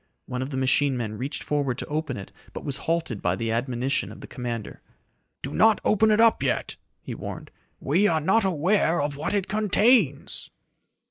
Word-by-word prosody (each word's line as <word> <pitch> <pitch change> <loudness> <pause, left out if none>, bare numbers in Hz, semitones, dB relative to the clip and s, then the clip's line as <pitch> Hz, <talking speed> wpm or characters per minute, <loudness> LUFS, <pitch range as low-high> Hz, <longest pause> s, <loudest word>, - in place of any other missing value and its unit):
One 125 0 -4
of 130 - -3
the 135 - -4
machine 135 +1 +2
men 110 -3 -3
reached 135 +4 -4
forward 140 -4 -1
to - - -5
open 150 -3 -3
it 100 - -9 0.2
but - - -7
was 140 -2 0
halted 165 -10 -1
by 90 +1 +1
the 115 +3 -2
admonition 125 +3 -1
of - - -11
the - - -9
commander. 120 -4 -6 0.6
"Do - - -4
not 220 -1 +4
open 220 +1 +4
it 215 0 +3
up 230 -1 +5
yet!" - - -1 0.3
he - - -6
warned. - - -7 0.3
"We 205 +2 +2
are 160 -4 +2
not 195 +9 +2
aware 180 0 +2
of 145 0 -1
what 150 +8 -2
it 200 -2 0
contains!" 210 - +2
145 Hz, 190 wpm, -25 LUFS, 125-195 Hz, 0.6 s, up